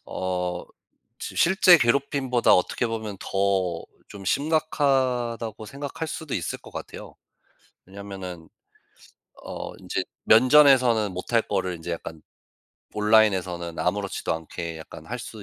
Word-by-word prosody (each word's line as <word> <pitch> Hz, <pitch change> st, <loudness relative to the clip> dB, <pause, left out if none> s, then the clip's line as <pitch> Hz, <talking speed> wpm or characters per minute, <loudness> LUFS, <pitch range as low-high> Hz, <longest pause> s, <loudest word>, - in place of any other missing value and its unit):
어 90 Hz, -1 st, -3 dB, 0.5 s
시 -, -, -7 dB
실제 180 Hz, -1 st, +6 dB
괴롭힘보다 130 Hz, 0 st, +2 dB
어떻게 90 Hz, +6 st, +1 dB
보면 110 Hz, -3 st, -4 dB
더 95 Hz, -3 st, 0 dB, 0.3 s
좀 100 Hz, -1 st, -10 dB
심각하다고 130 Hz, -, 0 dB
생각할 140 Hz, +6 st, -6 dB
수도 155 Hz, -2 st, -6 dB
있을 85 Hz, -4 st, -3 dB
것 -, -, -13 dB
같아요. -, -, -9 dB, 0.7 s
왜냐하면은 95 Hz, -3 st, -9 dB, 0.9 s
어 -, -, -6 dB
인제 -, -, -2 dB, 0.2 s
면전에서는 125 Hz, -3 st, +5 dB
못할 105 Hz, +6 st, 0 dB
거를 90 Hz, -4 st, -2 dB
인제 85 Hz, +1 st, -7 dB
약간 80 Hz, -1 st, -6 dB, 0.7 s
온라인에서는 95 Hz, -6 st, +2 dB
아무렇지도 -, -, -1 dB
않게 80 Hz, +1 st, -6 dB
약간 80 Hz, 0 st, -11 dB
할 125 Hz, +3 st, -5 dB
수 110 Hz, -3 st, -9 dB
105 Hz, 270 characters per minute, -25 LUFS, 90-130 Hz, 0.9 s, 실제